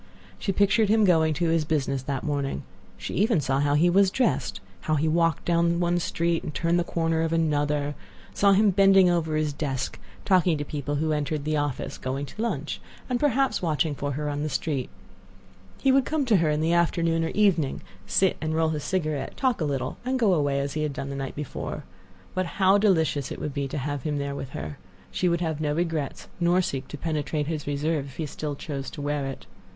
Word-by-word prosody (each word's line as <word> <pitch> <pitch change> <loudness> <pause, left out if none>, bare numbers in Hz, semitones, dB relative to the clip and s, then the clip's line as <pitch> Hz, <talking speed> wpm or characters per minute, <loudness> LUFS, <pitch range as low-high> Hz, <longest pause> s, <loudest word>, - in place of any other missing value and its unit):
She 195 - -1
pictured 200 +2 +3
him 220 0 +4
going 160 -4 +3
to 170 +2 0
his 165 -1 +2
business 140 -3 -1
that 135 0 -3
morning. 140 - -2 0.3
She - - -6
even 210 -2 +2
saw 135 -1 0
how 145 0 +2
he 160 +4 +4
was 190 +2 +5
dressed; 250 +6 0 0.2
how 155 - 0
he 155 +2 +1
walked 165 +1 +1
down 170 0 +2
one 175 0 +2
street, 170 0 0
and - - -5
turned 170 +3 +1
the - - +1
corner 165 -1 0
of 165 0 0
another; 145 -3 +1 0.4
saw 200 -1 +4
him 205 +1 +4
bending 195 -1 +6
over 160 -3 0
his 155 -1 0
desk, 135 -3 -3 0.3
talking 180 -4 +3
to 145 - -3
people 145 0 -3
who 155 +2 0
entered 150 0 -1
the 155 0 0
office, 145 -3 -3
going 135 +2 -3
to - - -12
his - - -3
lunch, 235 - -2 0.3
and 245 - +1
perhaps 270 -5 +2
watching 155 -3 +1
for 145 0 -3
her 150 +2 -3
on 145 0 -2
the 155 - -1
street. 140 -2 -2 0.9
He 270 - +3
would 270 0 +4
come 310 -3 0
to 225 -5 +4
her 165 -3 +2
in 150 0 +1
the 165 +2 +2
afternoon 165 -1 +2
or 165 - -1
evening, 185 -9 +2 0.3
sit 190 -1 +2
and 155 0 -1
roll 160 0 +2
his 150 -2 -3
cigarette, 155 -5 -2
talk 255 -7 +1
a - - +2
little, 135 -3 -2
and 260 +1 0
go 220 -6 +3
away 145 -4 +1
as 140 0 -2
he 155 - -2
had 150 -2 -1
done 140 -1 -5
the - - -4
night 135 -1 -4
before. 145 -3 -5 0.5
But 185 -1 -1
how 195 +1 +5
delicious 160 -9 +2
it - - -4
would 150 - -4
be 140 -1 -2
to 140 - -5
have 145 0 -3
him 150 +2 -2
there 140 0 -2
with 135 -2 -5
her! 75 +1 -6 0.3
She 180 - +1
would 170 0 0
have 160 -3 -2
no 150 -1 0
regrets, 160 -4 -2
nor 175 +1 +3
seek 135 -5 -3
to 150 - -7
penetrate 150 -1 -2
his 155 -1 -4
reserve 145 0 -1
if 135 - -12
he 160 - -2
still 145 0 -4
chose 140 -2 -5
to 150 - -8
wear 145 -1 -1
it. 135 - -7
155 Hz, 225 wpm, -26 LUFS, 145-175 Hz, 0.9 s, bending